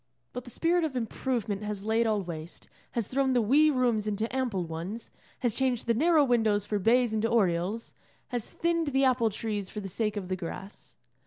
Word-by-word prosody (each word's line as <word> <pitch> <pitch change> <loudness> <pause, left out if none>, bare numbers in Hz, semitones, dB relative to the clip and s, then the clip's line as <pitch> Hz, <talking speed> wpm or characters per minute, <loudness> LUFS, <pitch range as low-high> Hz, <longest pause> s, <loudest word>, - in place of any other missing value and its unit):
But 250 0 -6
the - - -9
spirit 340 +6 +1
of 305 -5 -2
improvement 225 -3 -2
has 210 -1 -4
laid 225 +1 +2
all 210 -2 +1
waste, 165 -2 -8 0.3
has 230 -4 -1
thrown 265 0 +1
the 245 - +4
wee 285 +8 +5
rooms 240 -6 +1
into 215 +4 -2
ample 240 -9 0
ones, 170 +8 -6 0.3
has 240 -3 +1
changed 255 -2 0
the 235 - +3
narrow 310 +5 +4
windows 220 -5 +2
for 210 -1 -1
bays 235 +3 +3
and 215 - +1
oriels, 205 -1 +1 0.4
has 245 -4 -3
thinned 335 -1 0
the 270 +1 +3
apple 250 -3 +3
trees 205 -2 -3
for 210 - -6
the 195 - -5
sake 210 +3 -2
of 190 -3 -4
the 185 - -1
grass. 185 +3 -8
225 Hz, 195 wpm, -29 LUFS, 205-255 Hz, 0.4 s, wee